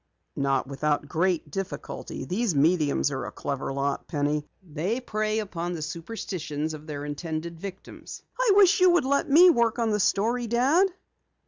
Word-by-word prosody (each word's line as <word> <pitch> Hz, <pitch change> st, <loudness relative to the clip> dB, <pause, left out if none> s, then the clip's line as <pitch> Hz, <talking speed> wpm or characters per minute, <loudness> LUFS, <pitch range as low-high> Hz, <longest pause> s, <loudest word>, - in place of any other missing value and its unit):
"Not 140 Hz, 0 st, +1 dB
without 145 Hz, +2 st, -1 dB
great 165 Hz, -1 st, 0 dB
difficulty. 195 Hz, +3 st, -5 dB
These 200 Hz, -1 st, -1 dB
mediums 150 Hz, -1 st, +2 dB
are 135 Hz, -, -3 dB
a -, -, -7 dB
clever 140 Hz, -1 st, -4 dB
lot, 140 Hz, +1 st, -2 dB
Penny. 150 Hz, 0 st, -1 dB, 0.2 s
They 180 Hz, -, -2 dB
prey 215 Hz, -3 st, -2 dB
upon 175 Hz, -5 st, -3 dB
the 160 Hz, -3 st, -4 dB
superstitions 160 Hz, -3 st, -4 dB
of 155 Hz, 0 st, -10 dB
their 145 Hz, -1 st, -5 dB
intended 160 Hz, +2 st, -5 dB
victims." 195 Hz, +1 st, -9 dB, 0.2 s
"I -, -, +4 dB
wish 390 Hz, -3 st, +6 dB
you 365 Hz, 0 st, +6 dB
would 350 Hz, -, +3 dB
let 280 Hz, +2 st, +1 dB
me 350 Hz, +6 st, +8 dB
work 235 Hz, -4 st, +1 dB
on 230 Hz, -2 st, +1 dB
the 210 Hz, -, +1 dB
story, 230 Hz, +5 st, +1 dB
Dad." 270 Hz, -, +3 dB
175 Hz, 160 wpm, -26 LUFS, 150-230 Hz, 0.2 s, me